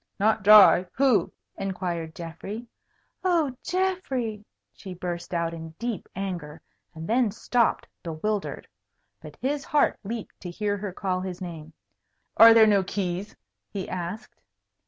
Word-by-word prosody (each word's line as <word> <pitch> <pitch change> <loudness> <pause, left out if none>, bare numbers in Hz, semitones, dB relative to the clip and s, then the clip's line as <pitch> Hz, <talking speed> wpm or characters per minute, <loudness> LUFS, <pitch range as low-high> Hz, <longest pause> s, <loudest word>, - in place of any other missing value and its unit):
"Not 220 +2 +2
dry? 200 -3 +8
Who?" 250 -9 +3 0.3
inquired 175 -4 -3
Geoffrey. 195 +7 -7 0.6
"Oh, 330 -8 +1
Geoffrey!" 275 - -2 0.3
she 190 -3 -9
burst 175 -1 -5
out 170 -1 -1
in 160 -1 -8
deep 235 -5 -4
anger, 175 -6 -5 0.4
and 160 +1 -7
then 240 0 +3
stopped, 235 +3 0
bewildered. 195 +5 -3 0.5
But - - -11
his 280 +2 -1
heart 295 - +2
leaped 225 +2 -6
to 180 - -7
hear 205 +3 -1
her 205 -1 -5
call 185 0 -2
his 185 -1 -5
name. 165 -4 -8 0.6
"Are 225 +1 +9
there 225 -1 +8
no 205 -2 +4
keys?" 190 +1 -3 0.3
he 195 -2 -5
asked. 180 +5 -6
195 Hz, 135 wpm, -26 LUFS, 175-225 Hz, 0.6 s, Are